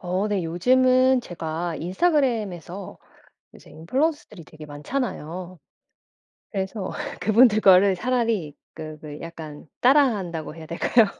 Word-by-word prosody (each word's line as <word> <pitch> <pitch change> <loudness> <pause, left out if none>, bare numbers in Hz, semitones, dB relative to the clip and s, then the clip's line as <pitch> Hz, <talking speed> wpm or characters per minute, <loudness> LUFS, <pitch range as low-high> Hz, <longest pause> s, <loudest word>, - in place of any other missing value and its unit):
어 185 +3 -1
네. 195 -4 -1
요즘은 255 +8 +3
제가 165 -3 -5
인스타그램에서 200 - -1 0.6
요새 - - -16
인플루언서들이 255 - -2
되게 155 0 -13
많잖아요. 175 - -5 0.9
그래서 190 -1 -3 0.3
그분들 215 0 +5
거를 195 0 +6
차라리 225 - -1 0.2
그 155 -1 -8
왜 150 -1 -8
약간 160 -3 -9
따라한다고 210 - +2
해야 160 -1 -10
될까요? 215 +7 +3
190 Hz, 290 characters per minute, -24 LUFS, 165-245 Hz, 0.9 s, 거를